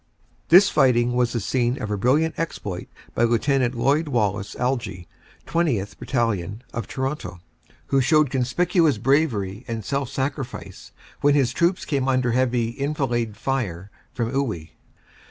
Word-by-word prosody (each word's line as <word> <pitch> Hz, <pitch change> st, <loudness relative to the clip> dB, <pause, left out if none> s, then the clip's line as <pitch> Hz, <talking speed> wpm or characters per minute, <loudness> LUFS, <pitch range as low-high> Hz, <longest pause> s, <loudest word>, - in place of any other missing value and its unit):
This 185 Hz, +4 st, +8 dB
fighting 120 Hz, -2 st, +3 dB
was 125 Hz, -1 st, +1 dB
the 120 Hz, -, -1 dB
scene 120 Hz, +5 st, 0 dB
of 105 Hz, -, -4 dB
a -, -, +1 dB
brilliant 145 Hz, +10 st, +2 dB
exploit 105 Hz, -, -4 dB, 0.3 s
by -, -, +1 dB
Lieut. 125 Hz, +2 st, +2 dB
Lloyd 145 Hz, +7 st, +2 dB
Wallace 105 Hz, -6 st, -1 dB
Algie, 120 Hz, -9 st, -2 dB, 0.4 s
20th. 120 Hz, -, -1 dB
Battalion, 110 Hz, -, -1 dB
of 115 Hz, -, -4 dB
Toronto, 130 Hz, -8 st, -4 dB, 0.5 s
who 135 Hz, -1 st, +2 dB
showed 150 Hz, +1 st, +3 dB
conspicuous 155 Hz, -, +2 dB
bravery 115 Hz, -5 st, +1 dB
and 115 Hz, -3 st, -4 dB
self 140 Hz, +3 st, -1 dB
sacrifice 135 Hz, -1 st, -5 dB, 0.3 s
when 145 Hz, 0 st, +4 dB
his 130 Hz, -3 st, +2 dB
troops 175 Hz, +5 st, +1 dB
came 135 Hz, -3 st, -1 dB
under 130 Hz, -2 st, +2 dB
heavy 120 Hz, -2 st, +1 dB
enfilade 120 Hz, -7 st, -1 dB
fire 100 Hz, -9 st, -3 dB, 0.2 s
from 115 Hz, -2 st, -2 dB
Iwuy. 110 Hz, -, -2 dB
125 Hz, 135 wpm, -23 LUFS, 115-140 Hz, 0.5 s, This